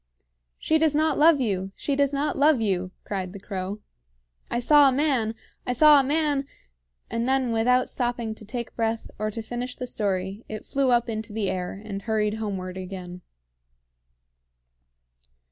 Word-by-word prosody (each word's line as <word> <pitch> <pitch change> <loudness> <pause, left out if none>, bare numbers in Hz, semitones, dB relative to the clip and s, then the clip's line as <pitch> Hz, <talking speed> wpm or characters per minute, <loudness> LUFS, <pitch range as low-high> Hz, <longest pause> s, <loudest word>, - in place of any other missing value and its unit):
"She 315 - +1
does 310 -2 +3
not 310 0 +2
love 315 -1 +6
you! 195 -5 -1
she 285 - -2
does 280 0 +2
not 290 +1 -1
love 290 -1 +4
you!" 185 -4 0
cried 190 -2 -4
the 200 - -8
crow. 195 +1 -5 0.7
"I 240 - -1
saw 290 +3 +6
a - - 0
man 255 -5 +1 0.3
I 250 - +1
saw 300 +3 +7
a - - +3
man, 290 -1 0 0.3
" - - -30
and 230 +2 -1
then, 265 -2 +2
without 250 +3 +3
stopping 240 -2 -2
to 215 - -14
take 235 +2 -6
breath, 225 -1 -2
or 215 0 -1
to 225 +1 -6
finish 245 +2 -5
the 250 - -5
story, 200 -2 -2
it 215 0 -6
flew 275 -1 +1
up 240 -1 +3
into 220 -1 -4
the 210 -3 -1
air, 180 +1 -4
and 200 -2 -5
hurried 210 -1 0
homeward 185 -3 -4
again. 180 -1 -7
225 Hz, 170 wpm, -25 LUFS, 200-270 Hz, 0.7 s, saw